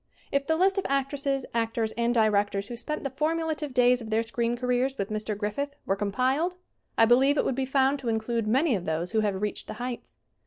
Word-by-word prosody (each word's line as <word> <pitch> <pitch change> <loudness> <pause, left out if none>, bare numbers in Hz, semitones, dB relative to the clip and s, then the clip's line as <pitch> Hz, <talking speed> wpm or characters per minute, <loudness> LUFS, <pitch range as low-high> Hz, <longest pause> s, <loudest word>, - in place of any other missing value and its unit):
If 280 0 0
the 320 - +2
list 380 +3 +3
of - - -4
actresses, 275 0 0
actors 225 -1 0
and 235 +1 0
directors 205 -3 +1
who 240 - -5
spent 300 +6 -4
the 275 - -3
formulative 310 +1 -1
days 250 0 +4
of 225 - -7
their 220 +1 +2
screen 235 +1 -1
careers 250 +2 0
with 200 +1 -3
Mr. 215 -1 -2
Griffith 255 +8 -3
were 195 - +1
compiled 255 - 0 0.4
I 225 - +7
believe 265 +5 +4
it - - +2
would - - +1
be 265 +1 -1
found 270 +1 +2
to 250 -3 -3
include 225 0 -1
many 265 +6 +3
of 185 -5 -2
those 160 +3 -2
who 220 - +2
have 205 -3 0
reached 210 - -3
the - - -6
heights. 245 0 -6
245 Hz, 220 wpm, -27 LUFS, 220-275 Hz, 0.4 s, I